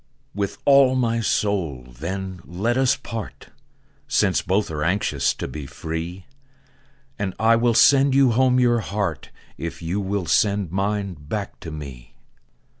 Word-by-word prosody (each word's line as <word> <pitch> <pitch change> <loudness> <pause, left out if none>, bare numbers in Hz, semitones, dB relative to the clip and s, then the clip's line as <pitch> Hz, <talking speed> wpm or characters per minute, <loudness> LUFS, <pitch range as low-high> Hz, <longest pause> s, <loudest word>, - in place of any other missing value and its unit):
TO....... - - -7
With 100 -1 -2
all 135 -2 +6
my 115 -2 +1
soul, 95 - -1
then, 90 +8 -6
let 105 +8 -1
us 130 +1 +3
part, 115 -2 -8 0.6
Since - - +2
both 95 -1 0
are 75 -1 -3
anxious 75 -6 +1
to - - -5
be 75 -3 -7
free; 80 +5 -6 0.9
And 95 -2 -2
I 115 +1 +4
will 115 0 +2
sand 135 +1 +5
you 135 -3 +5
home 130 +2 +3
your 120 -1 +3
heart, 100 -8 -3 0.3
If 85 +1 -6
you 90 +5 -1
will 100 -1 -2
send 100 0 +1
mine 100 0 -1
back 100 +8 -5
to 85 - -8
me. 70 -6 -9
100 Hz, 150 wpm, -23 LUFS, 85-115 Hz, 0.9 s, all